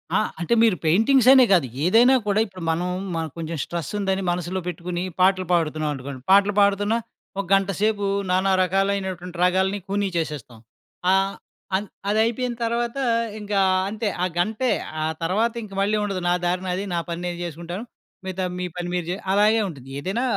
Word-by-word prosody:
ఆ! -, -, +4 dB, 0.2 s
అంటే 170 Hz, +7 st, +1 dB
మీరు 225 Hz, -5 st, +4 dB
పెయింటింగ్సనే 255 Hz, -, +6 dB
కాదు. 170 Hz, -8 st, +3 dB, 0.2 s
ఏదైనా 240 Hz, +7 st, +6 dB
కూడా 205 Hz, +1 st, +2 dB
ఇప్పుడు 185 Hz, -4 st, -10 dB
మనం 175 Hz, +2 st, -1 dB, 0.3 s
మనకు 160 Hz, -3 st, -3 dB
కొంచెం 165 Hz, 0 st, -4 dB
స్ట్రెస్సుందని 190 Hz, +4 st, -2 dB
మనసులో 175 Hz, +1 st, -2 dB
పెట్టుకుని 175 Hz, +1 st, -4 dB, 0.2 s
పాటలు 185 Hz, 0 st, +3 dB
పాడుతున్నావండుకోండి. 150 Hz, -5 st, -2 dB
పాటలు 200 Hz, +1 st, +5 dB
పాడుతున్న, 200 Hz, +1 st, +2 dB, 0.4 s
ఒక 200 Hz, -, -1 dB
గంట 195 Hz, 0 st, +3 dB
సేపూ 210 Hz, -1 st, +1 dB, 0.2 s
నానా 190 Hz, +1 st, +2 dB
రకాలైనటువంటి 190 Hz, -2 st, -1 dB
రాగాలని 190 Hz, +2 st, +2 dB
కూని 200 Hz, 0 st, 0 dB
చేసేస్తాం. 145 Hz, -8 st, -4 dB, 0.5 s
ఆహ్, 195 Hz, +1 st, +2 dB, 0.4 s
అంత్ 205 Hz, 0 st, -6 dB, 0.2 s
అదయిపోయిన 230 Hz, +4 st, +1 dB
తర్వాత 235 Hz, +2 st, -1 dB, 0.4 s
ఇంకా 205 Hz, -1 st, -1 dB, 0.3 s
అంతే 215 Hz, +1 st, -3 dB, 0.2 s
ఆ -, -, +3 dB
గంటే. 220 Hz, +7 st, 0 dB, 0.3 s
ఆ -, -, 0 dB, 0.2 s
తర్వాత 215 Hz, +7 st, +1 dB
ఇంక 205 Hz, -2 st, -10 dB
మళ్ళీ 210 Hz, +2 st, +1 dB
ఉండదు. 195 Hz, -3 st, -2 dB
నా -, -, +3 dB
దారి 180 Hz, +1 st, 0 dB
నాది. 185 Hz, +2 st, -2 dB
నా -, -, +1 dB
పని 170 Hz, 0 st, -4 dB
నేను 175 Hz, 0 st, -4 dB
చేసుకుంటాను. 170 Hz, +4 st, -6 dB, 0.4 s
మిగతా 190 Hz, 0 st, -3 dB, 0.2 s
మీ 180 Hz, -, -2 dB
పని 175 Hz, 0 st, -4 dB
మీరు 180 Hz, -2 st, -1 dB
చే 180 Hz, -, -1 dB, 0.2 s
అలాగే 210 Hz, +3 st, +4 dB
ఉంటది. 135 Hz, -4 st, -11 dB
ఏదైనా 195 Hz, -, -2 dB
190 Hz, 160 wpm, -23 LUFS, 175-210 Hz, 0.5 s, పెయింటింగ్సనే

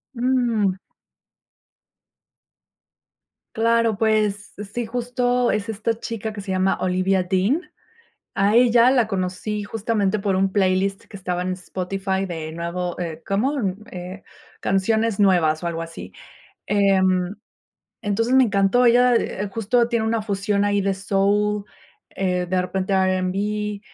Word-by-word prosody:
Mm. 235 Hz, -6 st, +1 dB, 2.8 s
Claro, 230 Hz, -1 st, +2 dB
pues, 210 Hz, -2 st, 0 dB, 0.2 s
sí, 240 Hz, +2 st, -3 dB
justo 245 Hz, +1 st, 0 dB
es 210 Hz, -1 st, -2 dB
esta 225 Hz, +1 st, -2 dB
chica 225 Hz, -2 st, -4 dB
que 205 Hz, -1 st, -7 dB
se 195 Hz, -1 st, -5 dB
llama 190 Hz, +1 st, +1 dB
Olivia 185 Hz, +1 st, +1 dB
Dean. 190 Hz, -, +1 dB, 0.7 s
A 200 Hz, +2 st, +2 dB
ella 240 Hz, 0 st, +6 dB
la 245 Hz, -5 st, +2 dB
conocí 195 Hz, +2 st, -3 dB
justamente 215 Hz, -1 st, -1 dB
por 195 Hz, -2 st, 0 dB
un 190 Hz, 0 st, +1 dB
playlist 195 Hz, 0 st, +1 dB
que 205 Hz, -, -11 dB
estaba 180 Hz, -2 st, -3 dB
en 185 Hz, 0 st, -2 dB
Spotify 190 Hz, +1 st, -3 dB
de 160 Hz, -3 st, -5 dB
nuevo, 170 Hz, +1 st, -4 dB
eh, 165 Hz, -2 st, -5 dB
¿cómo? 220 Hz, +9 st, 0 dB, 0.4 s
Eh, 180 Hz, +2 st, -8 dB, 0.4 s
canciones 220 Hz, +3 st, +1 dB
nuevas 175 Hz, -6 st, +3 dB
o -, -, -3 dB
algo 165 Hz, -1 st, -3 dB
así. 130 Hz, -, -9 dB, 0.5 s
Em, 190 Hz, -2 st, +2 dB, 0.7 s
entonces, 230 Hz, +5 st, 0 dB
me 265 Hz, 0 st, +6 dB
encantó, 200 Hz, +3 st, +3 dB
ella, 245 Hz, +1 st, +5 dB
eh, 205 Hz, -2 st, -2 dB
justo 225 Hz, +3 st, +1 dB
tiene 235 Hz, -2 st, 0 dB
una 225 Hz, 0 st, 0 dB
fusión 200 Hz, -1 st, 0 dB
ahí 205 Hz, 0 st, +1 dB
de 195 Hz, 0 st, 0 dB
soul, 200 Hz, +1 st, +1 dB, 0.5 s
eh, 180 Hz, -2 st, -1 dB
de 185 Hz, 0 st, +1 dB
repente 190 Hz, +1 st, -2 dB
r&b, 195 Hz, +2 st, 0 dB
200 Hz, 130 wpm, -22 LUFS, 185-225 Hz, 2.8 s, ella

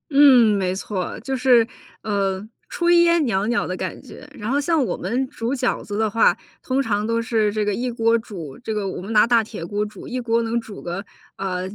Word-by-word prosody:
嗯， 255 Hz, -7 st, +7 dB
没 185 Hz, -1 st, -1 dB
错。 190 Hz, -1 st, -4 dB
就 265 Hz, +3 st, -3 dB
是， 250 Hz, -2 st, +5 dB, 0.4 s
呃， 200 Hz, -2 st, -1 dB, 0.2 s
炊 345 Hz, 0 st, 0 dB
烟 340 Hz, -2 st, +3 dB
袅 195 Hz, -2 st, 0 dB
袅 240 Hz, +1 st, +1 dB
的 185 Hz, -, -4 dB
感 185 Hz, -, -4 dB
觉。 290 Hz, -, -13 dB
然 225 Hz, -2 st, -4 dB
后 280 Hz, -, +2 dB
像 310 Hz, 0 st, +2 dB
我 -, -, -3 dB
们 240 Hz, +9 st, -1 dB
煮 235 Hz, +3 st, -3 dB
饺 255 Hz, -, -1 dB
子 205 Hz, -, -4 dB
的 220 Hz, 0 st, +1 dB
话， 225 Hz, +2 st, +3 dB, 0.2 s
通 265 Hz, +1 st, 0 dB
常 210 Hz, -4 st, -1 dB
都 230 Hz, 0 st, 0 dB
是 225 Hz, -3 st, +1 dB
这 215 Hz, 0 st, 0 dB
个 205 Hz, 0 st, 0 dB
一 250 Hz, +5 st, -2 dB
锅 230 Hz, -1 st, +2 dB
煮。 170 Hz, -, -9 dB
这 220 Hz, -, -4 dB
个 210 Hz, -2 st, -2 dB
我 185 Hz, -, -6 dB
们 200 Hz, +5 st, -5 dB
拿 210 Hz, -, +6 dB
大 235 Hz, -1 st, +4 dB
铁 205 Hz, -6 st, -7 dB
锅 205 Hz, +3 st, -2 dB
煮， 210 Hz, -, -10 dB
一 255 Hz, -, -3 dB
锅 235 Hz, -1 st, +1 dB
能 230 Hz, +1 st, -1 dB
煮 220 Hz, -3 st, -10 dB
个， 175 Hz, +3 st, -4 dB, 0.3 s
呃， 185 Hz, -2 st, -2 dB
225 Hz, 240 characters per minute, -22 LUFS, 200-245 Hz, 0.4 s, 嗯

